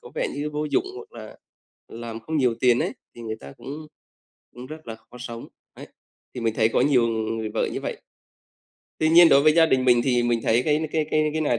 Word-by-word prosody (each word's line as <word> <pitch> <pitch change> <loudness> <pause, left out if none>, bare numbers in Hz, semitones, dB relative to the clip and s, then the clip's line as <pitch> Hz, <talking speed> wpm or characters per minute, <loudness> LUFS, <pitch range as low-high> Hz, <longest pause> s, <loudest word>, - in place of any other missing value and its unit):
có - - -13
vẻ - - -1
như 145 +1 -3
vô 150 0 -3
dụng 150 - 0
hoặc 435 +2 -11
là - - -11 0.5
làm 115 -1 -8
không 155 +8 -4
nhiều 125 -5 +2
tiền 125 -1 +4
ấy, - - -1 0.2
thì 120 - -11
người 110 -1 -5
ta 70 - -11
cũng 150 +3 -8 0.7
cũng 125 +1 -10
rất 155 +3 -11
là 115 - -5
khó 110 +2 -16
sống, 120 -1 -8 0.3
ấy, - - -11 0.5
thì 125 - -5
mình 115 -1 -1
thấy 110 -1 +3
có - - 0
nhiều 130 -5 +3
người 110 -1 -3
vợ - - +1
như - - -4
vậy. - - -4 1.0
Tuy 155 - +2
nhiên 170 +1 +8
đối 140 -1 +5
với 155 - +5
gia 165 +1 +5
đình 130 -4 +1
mình 120 -2 +5
thì 125 -2 +2
mình 120 -1 0
thấy 115 +2 +2
cái 150 +2 +1
n 160 - -2
cái 155 -1 0
cái 155 0 +2
cái 155 - -2
này 135 -6 +1
125 Hz, 245 wpm, -24 LUFS, 115-155 Hz, 1.0 s, nhiên